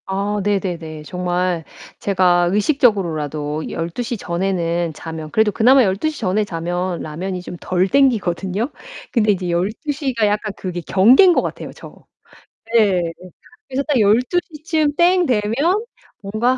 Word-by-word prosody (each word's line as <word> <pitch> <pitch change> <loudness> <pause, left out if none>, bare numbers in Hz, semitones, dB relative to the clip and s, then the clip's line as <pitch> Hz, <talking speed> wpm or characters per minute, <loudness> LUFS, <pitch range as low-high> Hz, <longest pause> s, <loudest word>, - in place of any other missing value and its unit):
아 200 +2 -2
네네네. 175 -6 -2
정말 180 0 -2 0.4
제가 180 -3 +2
의식적으로라도 170 - 0
12:00 225 +9 -4
전에는 175 -2 -1
자면 160 0 -7
그래도 220 -1 +3
그나마 255 +6 +5
12:00 230 +10 -1
전에 195 +4 +1
자면 175 -1 -3
라면이 180 +4 -5
좀 180 - -8
덜 185 +1 +1
당기거든요. 210 - +1 0.4
근데 215 -4 +3
이제 180 -2 -4
12:00 260 - -2
가 225 -2 +2
약간 210 +1 -1
그게 180 -2 -5
경계인 245 - +6
것 - - +2
같아요 - - -6
저. - - -12 0.8
네 205 -6 +4 0.7
그래서 270 +1 -2
딱 290 -5 +2
12:00 255 - +1
쯤 310 -4 +1
땡 355 +2 +4
되면 210 -6 0 0.7
뭔가 220 +6 0
195 Hz, 245 characters per minute, -19 LUFS, 175-240 Hz, 0.8 s, 경계인